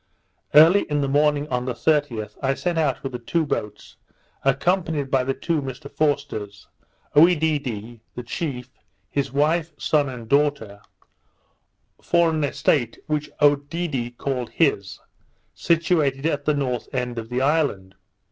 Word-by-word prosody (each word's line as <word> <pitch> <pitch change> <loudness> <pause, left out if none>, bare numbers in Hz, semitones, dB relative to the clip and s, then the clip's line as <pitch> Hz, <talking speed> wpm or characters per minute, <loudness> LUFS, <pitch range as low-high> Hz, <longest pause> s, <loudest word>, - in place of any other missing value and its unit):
Early 165 +7 +7
in 145 -1 0
the 140 - 0
morning 145 +1 +2
of 125 0 -2
the 125 - -2
30th, 145 -8 0
I 135 0 +1
set 175 +3 -2
out 150 -5 0
with 135 - -4
the 125 - -5
two 160 +7 -1
boats, 105 -7 -5 0.5
accompanied 150 0 0
by 135 -1 +3
the 135 +1 -2
two 165 -3 -1
Mr 135 +1 -8
Forsters; 140 -9 -2 0.5
Oedidee, 145 - +2 0.2
the 125 - -5
chief, 130 -1 -5 0.4
his 140 -1 -1
wife, 155 +3 +1
son, 145 -3 +1
and 120 -3 -8
daughter, 140 -7 0 1.2
for 170 -1 +2
an 155 -1 -1
estate 135 -3 0
which 150 -1 -2
Oedidee 145 -4 0
called 130 -3 -3
his, 135 - 0 0.5
situated 160 -5 +1
at 145 -3 -1
the 150 - +2
north 125 -4 -2
end 125 -2 -2
of 115 0 -8
the 125 +1 -1
island. 135 -11 0
140 Hz, 140 wpm, -23 LUFS, 125-155 Hz, 1.2 s, Early